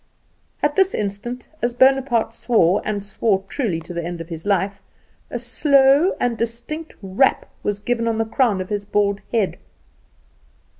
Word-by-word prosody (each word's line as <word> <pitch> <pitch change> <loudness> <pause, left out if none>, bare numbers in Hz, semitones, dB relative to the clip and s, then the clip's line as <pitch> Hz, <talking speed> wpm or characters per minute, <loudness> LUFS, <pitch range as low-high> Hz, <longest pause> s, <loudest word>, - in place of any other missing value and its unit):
At 295 0 +2
this 385 0 +3
instant, 215 +5 -4
as 240 0 -1
Bonaparte 260 -3 +3
swore, 205 -8 +2
and 205 -2 -2
swore 200 -1 0
truly 205 - -1
to 175 - -9
the 170 0 -3
end 175 0 -5
of 165 +1 -8
his 165 +2 -7
life, 200 0 0 0.5
a - - -3
slow 275 - +3
and 245 -1 +1
distinct 240 +8 -4
rap 195 +8 +2 0.2
was 205 0 -2
given 230 +2 -1
on 225 -1 0
the 225 - +1
crown 220 -4 +1
of 185 - -6
his 205 -1 -2
bald 200 -1 0
head. 220 -5 0
225 Hz, 160 wpm, -21 LUFS, 200-250 Hz, 0.5 s, this